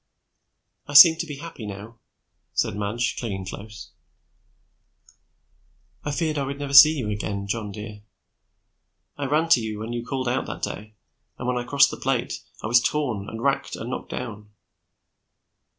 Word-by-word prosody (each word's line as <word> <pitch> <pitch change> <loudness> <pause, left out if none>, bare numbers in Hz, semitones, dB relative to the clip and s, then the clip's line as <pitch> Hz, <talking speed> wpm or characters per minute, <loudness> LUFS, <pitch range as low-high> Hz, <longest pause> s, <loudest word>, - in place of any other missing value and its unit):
"I 145 - -7
seem 160 +2 +10
to 170 - -4
be 145 - -6
happy 140 -7 -9
now," 105 +3 -9 0.5
said - - 0
Madge, 105 +4 -2
clinging 95 -5 -4
close. 105 +3 -9 2.1
"I - - -3
feared 155 +1 -1
I - - -1
would 140 +1 -4
never 140 -1 -5
see 150 +3 +9
you 110 -6 -2
again. 100 -1 -3
John 105 0 -3
dear. 105 +1 -9 1.1
I 145 -1 -3
ran 155 +4 +1
to 145 -8 +5
you 110 -1 -4
when 110 +3 -5
you 120 -1 -3
called 130 0 -3
out 125 +2 -1
that - - -7
day 105 +1 -5 0.4
and 125 - -5
when 125 0 0
I 120 - -5
crossed 140 0 +5
the - - -6
plate, 130 -2 -2 0.2
I - - -4
was 120 +3 +4
torn 120 -9 -2
and 115 +1 -7
racked 140 0 0
and 120 - -6
knocked - - -5
down. 105 -4 -6
120 Hz, 165 wpm, -24 LUFS, 105-140 Hz, 2.1 s, seem